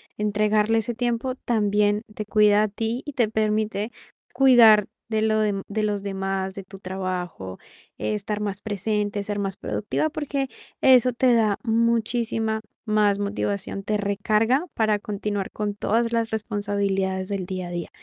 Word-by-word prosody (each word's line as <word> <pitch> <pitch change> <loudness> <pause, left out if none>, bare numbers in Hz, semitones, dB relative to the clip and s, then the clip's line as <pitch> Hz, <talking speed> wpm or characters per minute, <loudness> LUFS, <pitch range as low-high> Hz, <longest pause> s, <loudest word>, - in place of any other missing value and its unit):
entregarle 210 +1 +2
ese 225 +2 0
tiempo, 240 +2 -1
también 210 -3 +1
te 215 - -5
cuida 210 -1 +4
a - - +2
ti, 225 +4 -3
y 290 - -7
te 235 -4 +1
permite 215 0 0 0.4
cuidar 230 -6 +7 0.2
de 220 -1 0
lo 215 0 +2
dem 205 -2 0
de 215 +1 -1
los 205 -1 -1
demás, 195 -1 -2
de 195 - -7
tu 195 +1 -12
trabajo, 185 - -5 0.4
estar 210 0 -2
más 200 -1 -3
presente, 205 0 -2
ser 205 0 -3
más 195 0 -3
productiva, 310 +8 -2
porque, 280 -3 -2 0.3
eso 255 -1 +6
te 250 0 +3
da, 215 -3 +3
muchísima 225 -1 0 0.2
más 210 -2 +2
motivación, 200 -1 -2
te 210 +1 0
recarga, 215 - +1
para 215 -2 +2
continuar 205 -1 -3
con 210 -1 -3
todas 230 +3 0
las 230 -1 +1
responsabilidades, 200 -3 -1
del 195 -3 -2
día 185 -2 -4
a - - -8
día. 175 -2 -4
210 Hz, 155 wpm, -24 LUFS, 200-225 Hz, 0.4 s, cuidar